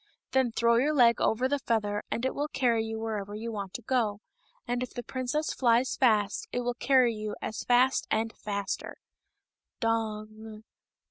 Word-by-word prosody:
Then 260 -3 +2
throw 235 +1 +3
your 295 +5 +2
leg 235 -3 +5
over 245 +4 +2
the 285 +1 0
feather, 210 -5 0
and 235 - -2
it 260 - 0
will 290 +1 -2
carry 240 -6 +1
you 220 0 -4
wherever 210 -2 -4
you 230 +2 -5
want 200 -3 -5
to 240 - -6
go; 220 -4 0 0.5
and 245 0 -1
if 250 - -5
the 245 - -4
princess 260 +6 -2
flies 245 0 +2
fast 210 -5 +2
it 245 - -1
will 245 0 -1
carry 245 -1 +3
you 215 -1 -5
as 215 - -4
fast 250 +2 +3
and 225 +1 0
faster.'' 200 -1 -4 0.5
" - - -63
Dong 220 -1 -3
230 Hz, 180 wpm, -29 LUFS, 215-250 Hz, 0.5 s, leg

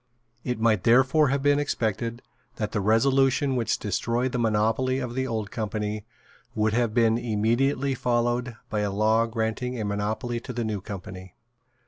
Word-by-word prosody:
It 125 -2 -2
might 110 -4 +2
therefore 130 +6 +4
have 135 +1 0
been 145 0 +4
expected 115 -3 -2 0.3
that 105 -2 -3
the 105 - -1
resolution 135 +5 +3
which 120 -3 0
destroyed 120 +5 -1
the 125 - -2
monopoly 115 +3 +1
of 125 -3 -4
the 130 +1 -1
Old 110 -4 -3
Company 105 -1 -3 0.5
would 105 0 +1
have 115 -2 0
been 115 -1 +3
immediately 120 +5 +1
followed 120 -1 0 0.2
by 105 - 0
a 105 -1 0
law 110 +3 +2
granting 115 +2 -2
a 110 - -2
monopoly 110 +4 -2
to 125 - -8
the 120 0 -2
New 105 -3 -3
Company. 95 -3 -8
115 Hz, 160 wpm, -26 LUFS, 110-125 Hz, 0.5 s, therefore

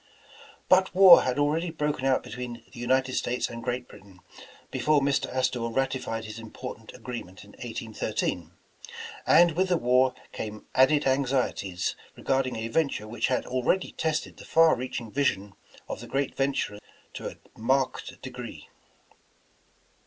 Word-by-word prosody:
But 185 -1 +4
war 185 -2 +10
had 130 -1 -1
already 155 +4 +1
broken 150 -4 -2
out 130 - +2
between 120 -1 -7
the - - -10
United 130 +2 +1
States 125 0 -1
and 115 0 -7
Great 125 +1 -3
Britain, 95 -2 -16 0.5
before 145 +3 +3
Mr. 140 -1 0
Astor 130 -1 0
ratified 120 -2 -2
his 110 +1 -7
important 115 0 -8
agreement 115 -7 -8
in - - -16
1813, - - -3 0.8
and 170 0 +7
with 185 +4 0
the 180 - +3
war 125 -1 +3 0.2
came 110 -1 -6
added 145 +3 +4
anxieties 130 -9 0 0.2
regarding 130 -1 0
a 110 0 -3
venture 135 -4 0
which 115 +1 -1
had 130 - 0
already 130 +9 0
tested 155 -1 -2
the - - -11
far 165 0 +5
reaching 120 -2 -5
vision 105 -8 0 0.3
of - - -5
the - - -9
gi^eal 135 0 -1
venturer 135 -6 -1 0.3
to - - -5
a - - -12 0.2
marked 130 +4 -1
degree. 125 -2 -8
130 Hz, 145 wpm, -27 LUFS, 115-140 Hz, 0.8 s, war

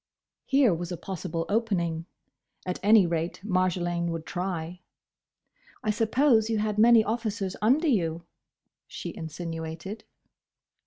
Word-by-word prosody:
Here 270 -7 +4
was 175 +1 -4
a 175 - -3
possible 170 -3 -4
opening. 180 -7 -1 0.6
At 180 -1 -3
any 210 -1 +6
rate 165 0 -2
Marjolaine 180 -3 0
would 165 -1 -4
try. 180 -1 -4 1.0
"I 215 - +2
suppose 225 +1 +3
you 225 - +1
had 210 0 -1
many 230 0 +7
officers 215 -4 -2
under 270 +10 +3
you?" 170 - 0 0.6
she - - -7
insinuated. 165 +3 -6
185 Hz, 115 wpm, -27 LUFS, 170-220 Hz, 1.0 s, many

